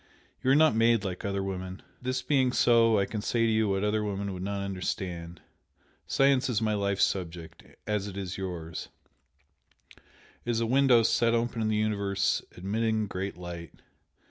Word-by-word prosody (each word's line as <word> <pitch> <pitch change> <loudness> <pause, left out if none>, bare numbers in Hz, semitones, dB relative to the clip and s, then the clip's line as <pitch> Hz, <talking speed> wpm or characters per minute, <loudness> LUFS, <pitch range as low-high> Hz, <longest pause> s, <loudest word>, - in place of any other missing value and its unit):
You 130 - 0
are 135 - +6
not 155 +1 +5
made 115 -2 +3
like 95 -3 -4
other 100 -1 -1
women. 95 -1 -5 0.2
This 130 +1 -2
being 130 -4 +2
so 115 -3 +4
I 100 - +2
can 105 0 -4
say 115 +2 +1
to 115 - +2
you 110 -1 +2
what 95 0 0
other 105 +1 +1
women 100 -1 -3
would 90 - -6
not 100 +1 -3
understand. 90 -3 -4 0.7
Science 135 -1 +3
is 115 -3 +1
my 110 -1 0
life 100 -1 0
subject, 85 -3 -2 0.2
as 105 -1 -1
it 100 -1 -7
is 95 -2 -4
yours, 85 -4 -5 1.1
it - - -24 0.4
is 120 -1 0
a 115 - +1
window 125 -1 +4
set 115 +1 +3
open 115 0 -1
in 110 - +1
the 110 - +1
universe 100 -2 0 0.2
admitting 110 +3 0
great 95 -1 -4
light. 85 -2 -8
105 Hz, 175 wpm, -28 LUFS, 95-115 Hz, 1.1 s, are